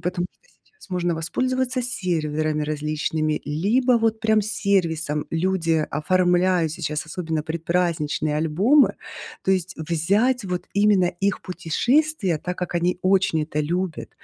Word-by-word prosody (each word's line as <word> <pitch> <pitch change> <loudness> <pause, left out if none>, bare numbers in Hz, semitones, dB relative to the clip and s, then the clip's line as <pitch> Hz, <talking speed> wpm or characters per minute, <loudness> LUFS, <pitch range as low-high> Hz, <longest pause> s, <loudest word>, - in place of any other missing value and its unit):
потому 180 +1 -2
что - - -40 0.2
сейчас 430 - -20
можно 175 -2 0
воспользоваться 255 +9 -1
серверами 155 -9 -1
различными, 155 +1 -1
либо 210 - +1
вот 225 -1 +1
прям 220 -1 +3
сервисом. 170 -8 0
Люди 165 -2 +1
оформляют 180 +1 +2
сейчас 150 -1 -3
особенно 160 -1 -3
предпраздничные 160 -2 -1
альбомы. 190 - +3 0.5
То - - +2
есть 185 0 -1
взять 200 +10 +1
вот 180 -2 -3
именно 200 -2 +4
их 195 +3 -1
путешествия, 190 - 0
так 180 +3 -5
как 180 -1 -4
они 175 +1 +1
очень 185 -4 +2
это 150 0 -2
любят, 175 +2 -2
175 Hz, 125 wpm, -23 LUFS, 155-200 Hz, 0.5 s, именно